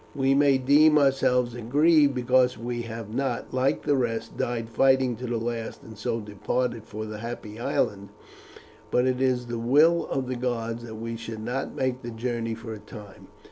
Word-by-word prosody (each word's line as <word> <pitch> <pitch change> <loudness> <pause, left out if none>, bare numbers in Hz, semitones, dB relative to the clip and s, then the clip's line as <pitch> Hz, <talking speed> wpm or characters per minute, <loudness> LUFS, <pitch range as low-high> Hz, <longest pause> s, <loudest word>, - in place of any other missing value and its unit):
We 135 0 +2
may 140 -1 +4
deem 150 +4 +5
ourselves 130 -3 +2
aggrieved 145 +5 +3
because 125 -1 +3
we 120 +1 -4
have 115 -1 -7
not, 130 -1 -2
like 130 +1 +1
the 145 - +2
rest, 115 -3 -2
died 115 -1 -2
fighting 130 +1 +3
to 125 +2 -5
the 120 0 -1
last, 115 0 -4
and 110 - -11
so 110 +3 -2
departed 110 +2 -2
for 110 0 -6
the 105 -1 -7
Happy 115 -1 -7
Island; 100 -4 -1 0.8
but 125 - +2
it 130 0 0
is 125 -2 +1
the 120 -1 -4
will 150 +8 +4
of 135 -2 -2
the 130 - -2
gods 120 -2 -2
that 110 -2 -8
we 115 +1 -5
should 115 -1 -7
not 125 +4 -3
make 130 -1 -1
the 120 - -6
journey 115 0 -3
for 115 0 -7
a 110 - -8
time. 105 -2 -12
120 Hz, 185 wpm, -26 LUFS, 115-130 Hz, 0.8 s, deem